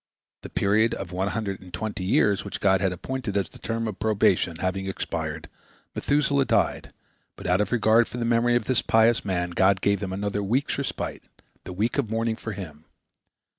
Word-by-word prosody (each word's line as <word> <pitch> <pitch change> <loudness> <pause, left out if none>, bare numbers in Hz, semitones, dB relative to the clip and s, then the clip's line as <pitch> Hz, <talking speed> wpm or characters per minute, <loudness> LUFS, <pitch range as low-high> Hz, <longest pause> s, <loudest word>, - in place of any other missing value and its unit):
The - - -9
period 110 +3 +2
of 95 -2 -6
one 95 +2 -1
hundred 100 -1 -3
and 90 -1 -13
twenty 110 -2 -4
years 100 +1 +2
which 100 - -6
God 95 -2 +3
had 95 -2 +2
appointed 110 +3 -3
as 95 -4 -1
the - - -15
term 115 0 -3
of 110 - -3
their - - -22
probation 100 -5 +2
having 95 +2 -2
expired, 95 - -4 0.5
Methuselah 140 -1 +1
died, - - 0 0.4
but - - -11
out 90 +2 +3
of 105 - -2
regard 115 -1 +4
for - - -7
the 120 - -1
memory 120 +1 +3
of 120 -3 +1
this 130 0 +2
pious 115 +1 +3
man 90 -3 -1
God 95 +2 +3
gave 100 0 +1
them 95 -2 -4
another 100 +1 -2
week's 125 +9 0
respite, 140 - -4 0.4
the - - -6
week 110 +9 0
of 120 -6 -1
mourning 115 0 0
for 110 -1 -6
him. 80 -6 -9
105 Hz, 200 wpm, -25 LUFS, 95-115 Hz, 0.5 s, regard